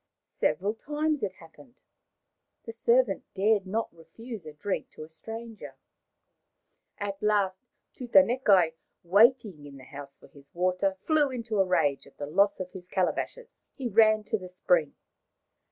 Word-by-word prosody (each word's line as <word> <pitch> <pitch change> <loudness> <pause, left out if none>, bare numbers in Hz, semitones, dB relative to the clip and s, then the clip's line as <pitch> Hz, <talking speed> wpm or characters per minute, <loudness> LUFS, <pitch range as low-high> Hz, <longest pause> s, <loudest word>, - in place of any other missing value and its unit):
Several 200 +3 -1
times 300 +5 -2
it 195 -3 -2
happened. 190 - -18 0.9
The 225 - -7
servant 235 -2 +2
dared 200 0 +2
not 220 -2 -3
refuse 215 +3 -10
a 155 - -9
drink 185 +6 -4
to - - -9
a - - -10
stranger. 225 +7 -9 1.2
At 200 -1 -5
last 200 -3 +1 0.3
Tutanekai, 200 -6 +4 0.3
waiting 205 - +3
in 140 -1 -12
the 130 - -13
house 140 +1 -10
for - - -18
his 140 +1 -18
water, 185 +2 0
flew 305 -3 +2
into 230 -4 -3
a 195 - +4
rage 160 -8 +1
at 140 - -20
the 145 - -4
loss 200 +7 +2
of 185 -1 -5
his 180 -1 -10
calabashes. 465 - -3
He 265 - -4
ran 215 -1 +4
to 210 +1 -2
the 185 -1 -9
spring. 175 -4 +1
200 Hz, 150 wpm, -28 LUFS, 180-230 Hz, 1.2 s, Tutanekai